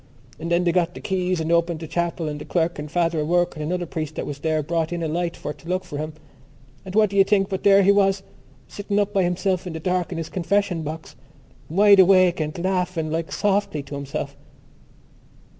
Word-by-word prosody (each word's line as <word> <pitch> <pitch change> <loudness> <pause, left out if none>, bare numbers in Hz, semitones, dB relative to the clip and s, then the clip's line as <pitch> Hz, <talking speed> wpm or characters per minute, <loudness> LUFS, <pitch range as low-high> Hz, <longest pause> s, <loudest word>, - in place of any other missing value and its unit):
So - - -7
then 170 +1 +2
they 175 - +2
got 175 0 0
the - - -7
keys 185 -2 -1
and 160 +1 -2
opened 170 -1 +2
the 160 - -7
chapel 170 0 -2
and 150 0 -5
the - - -5
clerk 170 -2 -1
and 150 +1 -6
Father 165 0 0
O'Rourke 175 +4 +1
and 155 - -6
another 175 +3 -2
priest 155 -2 -5
that - - -3
was 145 -1 -6
there 155 0 0
brought 165 +1 -1
in 170 -1 -3
a - - 0
light 170 +2 -2
for 150 - -5
to 165 - -14
look 185 +1 0
for 145 - -7
him.... 155 +1 -4 0.7
And 190 0 -8
what 215 -2 +4
do 200 - -2
you 195 - +8
think 195 -1 +2
but 190 -1 -3
there 200 -1 +6
he 200 - +6
was, 195 -1 +2 0.4
sitting 205 0 -3
up 205 0 +1
by 195 - +3
himself 180 +1 0
in 175 - -5
the 160 - -5
dark 180 +1 -1
in 175 - -4
his 165 -1 -4
confession 185 -1 0
box, 155 +1 -7 0.5
wide 200 +4 +6
awake 185 -2 +5
and 155 0 -3
laughing 180 -4 -1
like 165 0 -2
softly 200 -7 0
to 140 - -11
himself?" 140 0 -5
175 Hz, 225 wpm, -23 LUFS, 160-190 Hz, 0.7 s, you